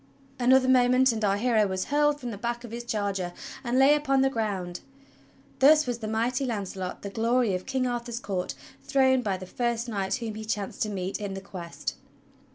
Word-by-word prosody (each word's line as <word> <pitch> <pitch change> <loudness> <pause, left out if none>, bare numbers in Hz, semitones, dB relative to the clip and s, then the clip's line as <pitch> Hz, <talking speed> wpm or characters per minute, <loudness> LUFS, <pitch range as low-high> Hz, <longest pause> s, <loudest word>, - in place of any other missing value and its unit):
Another 255 +1 +5
moment 255 0 +5
and 220 -1 -3
our 200 -1 +2
hero 220 -2 +2
was 190 -1 -2
hurled 295 0 +2
from 245 -4 -5
the 205 - -6
back 235 +1 -3
of 240 - -9
his 235 +1 -5
charger 200 -6 -2 0.3
and 245 0 0
lay 270 +2 +7
upon 275 -3 +2
the 270 0 +3
ground. 195 -7 -2 0.8
Thus 300 +3 +6
was 245 -2 -3
the 220 - -5
mighty 235 +5 0
Launcelot, 195 -6 -4
the 200 - -5
glory 230 0 +1
of 185 0 -4
King 260 -1 0
Arthur's 240 -1 -3
court, 180 - -3 0.3
thrown 260 -1 +3
by 200 -5 -1
the 185 - -8
first 235 +4 -2
knight 195 -4 -1
whom 230 -4 -4
he 220 +1 -6
chanced 210 -2 -3
to 215 - +1
meet 190 0 -3
in 200 -2 -4
the - - -4
Quest! 180 -3 -6
230 Hz, 200 wpm, -27 LUFS, 200-255 Hz, 0.8 s, lay